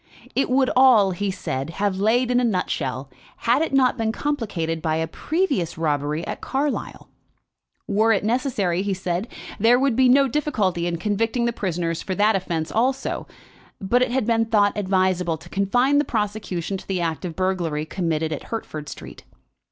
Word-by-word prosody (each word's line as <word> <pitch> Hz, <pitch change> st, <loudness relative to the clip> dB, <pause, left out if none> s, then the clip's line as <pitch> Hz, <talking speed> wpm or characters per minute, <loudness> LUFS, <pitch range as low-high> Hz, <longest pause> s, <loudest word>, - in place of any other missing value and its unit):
It 270 Hz, -, +1 dB
would 260 Hz, 0 st, +3 dB
all, 245 Hz, -7 st, +6 dB
he 195 Hz, +3 st, -2 dB
said, 135 Hz, -7 st, -3 dB
have 190 Hz, +2 st, -1 dB
laid 240 Hz, +5 st, +2 dB
in 245 Hz, -, +3 dB
a -, -, +1 dB
nutshell, 145 Hz, -, -1 dB, 0.4 s
had 240 Hz, +5 st, +3 dB
it 320 Hz, -, 0 dB
not 260 Hz, -2 st, +3 dB
been 220 Hz, -1 st, +1 dB
complicated 205 Hz, -, -2 dB
by 155 Hz, -1 st, 0 dB
a 160 Hz, 0 st, 0 dB
previous 290 Hz, -, -1 dB
robbery 150 Hz, 0 st, -1 dB
at -, -, -5 dB
Carlisle. 280 Hz, +2 st, -3 dB, 0.8 s
Were 215 Hz, +3 st, +2 dB
it 200 Hz, -3 st, +2 dB
necessary, 215 Hz, -7 st, 0 dB
he 200 Hz, -1 st, -1 dB
said, 180 Hz, +2 st, -2 dB, 0.3 s
there 230 Hz, +4 st, +5 dB
would 270 Hz, -3 st, +2 dB
be 260 Hz, 0 st, +4 dB
no 275 Hz, +2 st, +5 dB
difficulty 210 Hz, -, 0 dB
in 170 Hz, -1 st, -2 dB
convicting 225 Hz, +6 st, 0 dB
the 235 Hz, -, 0 dB
prisoners 170 Hz, -5 st, -2 dB
for 190 Hz, -, -3 dB
that 210 Hz, +2 st, +3 dB
offence 170 Hz, -4 st, -2 dB
also, 260 Hz, +4 st, -1 dB, 0.5 s
but 235 Hz, +6 st, +1 dB
it 255 Hz, -, +2 dB
had 255 Hz, -1 st, 0 dB
been 225 Hz, 0 st, +2 dB
thought 210 Hz, -2 st, +2 dB
advisable 185 Hz, -4 st, +1 dB
to 160 Hz, +2 st, -15 dB
confine 245 Hz, +10 st, +2 dB
the -, -, +3 dB
prosecution 205 Hz, -, -3 dB
to -, -, -13 dB
the 190 Hz, -2 st, -1 dB
act 165 Hz, -1 st, -2 dB
of 170 Hz, -3 st, -5 dB
burglary 175 Hz, -5 st, -1 dB
committed 160 Hz, -2 st, -2 dB
in 155 Hz, -, -2 dB
Hertford 155 Hz, -10 st, -6 dB
Street. -, -, -10 dB
200 Hz, 175 wpm, -23 LUFS, 170-245 Hz, 0.8 s, all